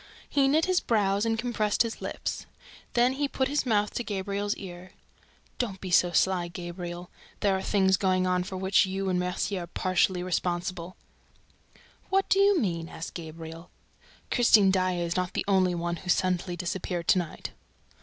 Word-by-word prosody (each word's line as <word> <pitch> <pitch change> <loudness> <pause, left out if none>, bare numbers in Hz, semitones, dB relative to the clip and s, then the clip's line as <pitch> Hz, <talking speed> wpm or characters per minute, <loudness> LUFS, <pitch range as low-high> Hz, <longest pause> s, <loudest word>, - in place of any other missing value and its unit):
He 275 -2 +2
knit 310 +4 +3
his 370 -1 +2
brows 205 -1 +1
and 225 0 +1
contracted 220 -3 +1
his 230 -1 -5
lips. - - -4 0.5
Then 245 +2 +3
he 285 +2 -1
put 265 -1 -1
his 285 -1 -1
mouth 210 -2 +1
to 240 - -2
Gabriel's 200 0 -2
ear: 180 -1 -10 0.7
"Don't 200 -6 -2
be 185 - -6
so 175 0 +4
sly, 180 0 +2
Gabriel. 175 0 -7 0.3
There 200 -2 +3
are 190 - -2
things 190 -2 +3
going 185 -1 +1
on 180 0 +1
for 185 +1 -6
which 190 +1 +3
you 190 0 -2
and 180 -1 +1
Mercier 180 +1 -2
are 170 - -7
partly 185 +1 +1
responsible." 180 0 -2 1.1
"What 390 0 +2
do 390 - +4
you 400 -2 +5
mean?" 170 - -2
asked 160 - -7
Gabriel. 165 0 -8 0.6
"Christine 215 -5 +5
Daae 185 -2 +1
is 170 - -2
not 180 0 -1
the - - -2
only 185 -2 +3
one 170 0 -2
who 180 - -9
suddenly 180 0 +1
disappeared 175 -1 -3
to 185 - +6
night." 170 -3 -6
185 Hz, 175 wpm, -28 LUFS, 175-210 Hz, 1.1 s, to